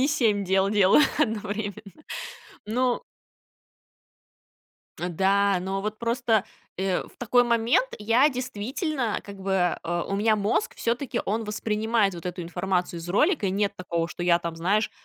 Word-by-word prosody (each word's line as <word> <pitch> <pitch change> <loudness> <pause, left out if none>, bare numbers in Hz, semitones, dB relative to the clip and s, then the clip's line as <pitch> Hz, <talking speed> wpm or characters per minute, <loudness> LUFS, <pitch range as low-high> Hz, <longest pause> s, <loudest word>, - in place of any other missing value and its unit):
не 275 - +3
7 215 -9 +2
дел 190 +1 +2
делаю 205 +7 +5 0.2
одновременно. 210 - -3 0.6
Но 250 - 0 2.0
Э, 175 - -1
да, 195 +2 +2
но 190 +2 -2
вот 215 +1 -4
просто, 230 -3 +1 0.3
э, 190 0 0
в - - -17
такой 245 +1 +3
момент 235 +2 +2
я 230 +7 +4
действительно, 255 - -2
как 200 -1 -9
бы, 190 -2 +1
а, 170 0 -2
у 195 - -2
меня 215 +1 +3
мозг 420 - 0
всё-таки 240 +3 -1
он 220 +3 -1
воспринимает 215 -1 0
вот 170 0 -7
эту 180 0 -4
информацию 180 0 -2
из 165 - -8
ролика, 285 - +2
и 185 - +1
нет 200 +2 0
такого, 170 -2 -2
что 175 - -6
я 175 -1 +4
там, 170 -1 -5
знаешь, 200 +6 +1
205 Hz, 150 wpm, -26 LUFS, 190-235 Hz, 2.0 s, делаю